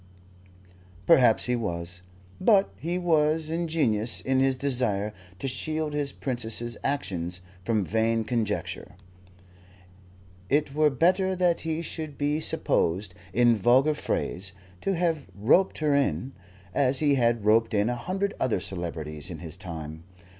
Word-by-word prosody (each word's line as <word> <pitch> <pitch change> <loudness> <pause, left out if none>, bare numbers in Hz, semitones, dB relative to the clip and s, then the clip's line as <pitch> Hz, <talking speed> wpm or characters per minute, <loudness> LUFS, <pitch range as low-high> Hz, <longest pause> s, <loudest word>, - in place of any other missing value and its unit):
Perhaps 120 -4 +5
he 125 - +1
was. 90 -5 -4 0.4
But 200 -1 +4
he 170 +3 -2
was 160 -2 +2
ingenuous 150 -10 +1
in 130 0 0
his 135 -1 +2
desire 120 -7 0 0.2
to 135 - -4
shield 155 +3 -2
his 145 -1 -1
Princess's 120 -2 -2
action 100 -12 -2 0.3
from 105 -1 0
vain 115 +3 +1
conjecture. 110 -6 -3 1.5
It 145 0 +1
were 155 0 +4
better 185 +7 +2
that 180 -2 +1
he 160 +1 -2
should 155 -3 -6
be 145 +1 0
supposed, 95 - 0 0.2
in 120 +4 +4
vulgar 125 +8 +4
phrase, 95 -9 -3 0.3
to 195 - 0
have 165 -4 -1
roped 120 - +3
her 150 -2 +1
in, 135 -2 0 0.4
as 135 -1 +2
he 145 0 +3
had 120 -4 +1
roped 110 +1 +3
in 105 +1 +2
a 120 - 0
hundred 190 - -2
other 120 -7 +1
celebrities 80 -3 -5
in 85 - -6
his 80 -1 -6
time. 80 -2 -7
125 Hz, 135 wpm, -27 LUFS, 105-155 Hz, 1.5 s, Perhaps